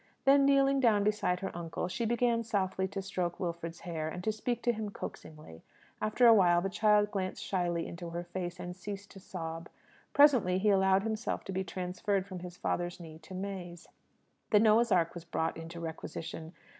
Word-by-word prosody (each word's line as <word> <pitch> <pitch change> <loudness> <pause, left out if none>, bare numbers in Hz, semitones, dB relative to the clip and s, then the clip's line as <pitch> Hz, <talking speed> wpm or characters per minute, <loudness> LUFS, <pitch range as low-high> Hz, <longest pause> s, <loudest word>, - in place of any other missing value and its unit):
Then 275 0 +6
kneeling 275 0 +4
down 220 -5 +4
beside 210 -4 +1
her 195 - -4
uncle, 170 +1 -3
she 230 +6 -2
began 235 0 +1
softly 190 -3 -1
to 195 0 -5
stroke 180 -3 -3
Wilfred's 170 -2 -4
hair, 160 -3 -3
and 180 +2 -6
to 220 - +1
speak 235 +3 -3
to 240 - +3
him 215 -1 -4
coaxingly. 155 - -9 0.4
After 215 +3 +2
a 230 - +9
while, 175 -5 +5
the 195 +2 -2
child 210 0 +3
glanced 185 -2 -3
shyly 175 -3 -1
into 170 0 -7
her 170 +1 -4
face, 175 0 -5
and 180 0 -6
ceased 200 +1 -7
to 195 - -11
sob. 165 -3 -6 0.4
Presently 255 -11 +5
he 205 +3 +2
allowed 190 0 +4
himself 220 +1 -2
to - - -6
be 190 0 -1
transferred 185 +2 -2
from 185 -2 -7
his 180 0 -9
father's 175 0 -2
knee 160 -2 -10
to 185 - -11
May's. 185 -3 -6 0.6
The 210 - +6
Noah's 220 +2 +4
Ark 170 -3 +3
was 175 - -8
brought 165 -1 -2
into 165 +1 -8
requisition. 160 0 -6
185 Hz, 190 wpm, -31 LUFS, 175-210 Hz, 0.6 s, a